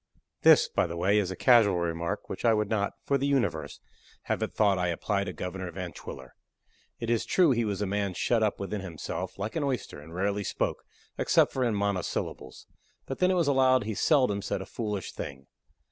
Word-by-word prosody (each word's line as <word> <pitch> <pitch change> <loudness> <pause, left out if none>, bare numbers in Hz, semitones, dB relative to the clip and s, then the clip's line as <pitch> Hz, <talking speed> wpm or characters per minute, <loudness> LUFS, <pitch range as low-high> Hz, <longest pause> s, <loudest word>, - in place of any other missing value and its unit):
This, - - +7
by - - 0
the 85 0 -6
way, 100 +5 +3
is 95 -3 -1
a 95 - -4
casual 110 -7 +5
remark, 85 -1 -2
which - - -6
I 115 -2 +4
would 105 0 -1
not, 100 -2 0
for 140 -1 +1
the 140 - 0
universe, 140 -3 -1 0.4
have - - -2
it - - -1
thought 100 -3 +2
I 90 - +1
apply 100 +4 -1
to - - -4
Governor 90 0 -5
Van 90 0 -6
Twiller. - - -10 0.7
It 115 0 -2
is 115 - +2
true 175 -6 +3
he 120 -2 +1
was 105 -1 -2
a - - 0
man 100 -1 -1
shut 115 +5 +1
up 105 -2 +1
within 100 +1 -3
himself, 85 -5 -5
like 105 +3 -4
an 160 - 0
oyster, 130 - -3
and 80 +2 -13
rarely 100 +2 0
spoke, - - -2 0.3
except - - +3
in 125 -4 +1
monosyllables; 100 -9 -3 0.4
but 135 - -5
then 185 - +4
it 185 - +2
was 170 -4 +2
allowed 130 -3 +4
he 110 +1 -3
seldom 125 -5 +2
said 100 - -2
a - - -6
foolish 105 -5 -4
thing. 70 0 -7
105 Hz, 205 wpm, -28 LUFS, 95-120 Hz, 0.7 s, This